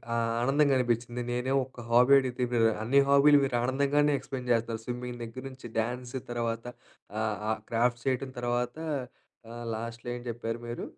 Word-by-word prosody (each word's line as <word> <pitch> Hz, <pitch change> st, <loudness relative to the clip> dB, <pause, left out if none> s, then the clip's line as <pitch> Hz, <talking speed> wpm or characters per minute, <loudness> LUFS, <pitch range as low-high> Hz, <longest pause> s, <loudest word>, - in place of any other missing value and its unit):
ఆహ్, 115 Hz, 0 st, +1 dB
ఆనందంగా 140 Hz, +2 st, +3 dB
అనిపించింది. 120 Hz, 0 st, -1 dB
నేనే 125 Hz, +2 st, -1 dB
ఒక్క 130 Hz, -, -22 dB
హాబీ 125 Hz, +3 st, +6 dB
అడిగితే 125 Hz, -1 st, -2 dB
మీరు 115 Hz, -1 st, +4 dB, 0.2 s
అన్ని 135 Hz, +5 st, +4 dB
హాబీలు 145 Hz, +1 st, +7 dB
మీరు 135 Hz, -2 st, 0 dB
ఆహ్, 120 Hz, -, 0 dB
ఆనందంగానే 140 Hz, +2 st, +2 dB
ఎక్స్‌ప్లెయిన్ 125 Hz, -2 st, -6 dB
చేస్తన్నారు 115 Hz, -1 st, 0 dB
స్విమ్మింగ్ 125 Hz, 0 st, -5 dB
దగ్గర 115 Hz, +3 st, -7 dB
నుంచి 130 Hz, -2 st, -10 dB
డ్యాన్స్ 125 Hz, +3 st, -3 dB, 0.2 s
తర్వాత 115 Hz, -1 st, -2 dB, 0.6 s
ఆహ్, 110 Hz, -2 st, -1 dB
ఆహ్, 110 Hz, -, 0 dB
క్రాఫ్ట్ 120 Hz, +1 st, +1 dB
చేయటం 130 Hz, 0 st, -1 dB
తర్వాత 120 Hz, +2 st, -1 dB, 1.0 s
లాస్ట్‌లో 115 Hz, +2 st, -6 dB
ఏం -, -, -9 dB
చెప్పారు 115 Hz, 0 st, -3 dB
మీరు? 120 Hz, 0 st, -5 dB
120 Hz, 160 wpm, -29 LUFS, 115-130 Hz, 1.0 s, హాబీలు